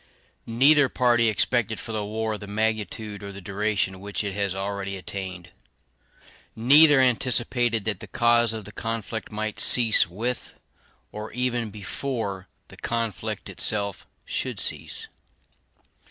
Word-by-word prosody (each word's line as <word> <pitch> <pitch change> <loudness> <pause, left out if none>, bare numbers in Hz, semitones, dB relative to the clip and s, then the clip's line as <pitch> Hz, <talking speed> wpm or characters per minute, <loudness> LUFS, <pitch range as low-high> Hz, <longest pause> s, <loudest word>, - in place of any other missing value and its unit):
Neither 135 +4 +4
party 120 -2 +3
expected 115 +1 +1
for 115 - -7
the 110 -1 -2
war 110 +1 -3
the 105 - -9
magnitude 110 0 -2
or 100 0 -7
the 100 - -8
duration 100 0 -1
which 100 +2 -3
it 100 -1 -3
has 100 -1 -1
already 100 0 -4
attained. 95 -2 -7 1.0
Neither 145 +5 +6
anticipated 120 -3 +2
that 105 -4 -1
the - - -9
cause 120 -1 +3
of 110 -2 -6
the 105 - -10
conflict 115 0 -5
might 110 0 -4
cease 115 -7 +6
with, 115 +8 -4 0.6
or 105 +1 -7
even 120 -2 -1
before, 100 -1 -4 0.2
the - - -14
conflict 115 -4 -3
itself 100 -3 -1 0.2
should - - -3
cease. - - 0
110 Hz, 130 wpm, -25 LUFS, 100-120 Hz, 1.0 s, Neither